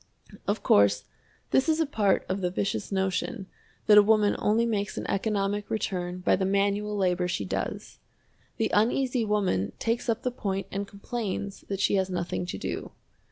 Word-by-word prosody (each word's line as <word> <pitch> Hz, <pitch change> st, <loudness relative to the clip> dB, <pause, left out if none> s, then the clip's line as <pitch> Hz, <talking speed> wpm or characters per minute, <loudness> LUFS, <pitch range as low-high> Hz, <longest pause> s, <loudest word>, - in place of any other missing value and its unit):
Of -, -, -1 dB
course, 100 Hz, 0 st, +4 dB, 0.5 s
this 265 Hz, +4 st, +3 dB
is 315 Hz, 0 st, +2 dB
a 325 Hz, -, +3 dB
part 215 Hz, -8 st, +1 dB
of 190 Hz, +1 st, -2 dB
the 180 Hz, -, +1 dB
vicious 195 Hz, +3 st, -2 dB
notion 190 Hz, +3 st, -1 dB, 0.4 s
that 210 Hz, -1 st, +8 dB
a -, -, +9 dB
woman 210 Hz, 0 st, +3 dB
only 225 Hz, +3 st, +2 dB
makes 205 Hz, -4 st, -2 dB
an -, -, -3 dB
economic 205 Hz, 0 st, -1 dB
return 180 Hz, -4 st, -2 dB
by -, -, +3 dB
the 190 Hz, -, -1 dB
manual 200 Hz, +2 st, +1 dB
labor 180 Hz, -2 st, +1 dB
she 180 Hz, -, -2 dB
does. -, -, -4 dB, 0.6 s
The 225 Hz, -2 st, 0 dB
Uneasy 245 Hz, +3 st, +2 dB
Woman 190 Hz, -, 0 dB
takes 230 Hz, +2 st, -1 dB
up 230 Hz, +1 st, 0 dB
the 250 Hz, -, 0 dB
point 195 Hz, -5 st, -3 dB
and 200 Hz, +1 st, -3 dB
complains 200 Hz, -1 st, -4 dB
that 195 Hz, -1 st, -3 dB
she 200 Hz, -, +3 dB
has 190 Hz, 0 st, 0 dB
nothing 175 Hz, 0 st, -3 dB
to -, -, -4 dB
do. -, -, -5 dB
200 Hz, 175 wpm, -27 LUFS, 190-220 Hz, 0.6 s, a